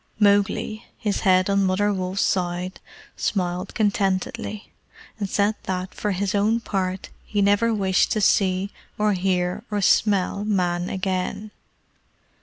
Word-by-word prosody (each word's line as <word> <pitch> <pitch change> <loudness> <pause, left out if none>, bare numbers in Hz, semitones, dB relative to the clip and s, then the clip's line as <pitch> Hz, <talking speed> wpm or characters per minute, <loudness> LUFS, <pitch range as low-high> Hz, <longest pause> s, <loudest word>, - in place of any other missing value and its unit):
Mowgli, 205 +1 +2
his 210 -2 -1
head 185 -2 +3
on 200 0 +2
Mother 200 +2 +2
Wolf's 185 0 -1
side, 180 0 -1 0.4
smiled 180 -1 -2
contentedly, 205 +1 -1 0.5
and 200 -2 -2
said 205 +2 +2
that, 185 0 -3
for 210 - -3
his 195 +2 -1
own 210 +3 +2
part, 190 -4 -3
he 205 - -3
never 205 +3 +3
wished 190 -4 +2
to 215 - 0
see, 195 -1 +2 0.3
or 210 0 +2
hear, 180 +1 0
or 210 -1 -1
smell 200 -1 +2
Man 180 -4 0
again. 190 +2 -2
195 Hz, 130 wpm, -23 LUFS, 185-205 Hz, 0.5 s, head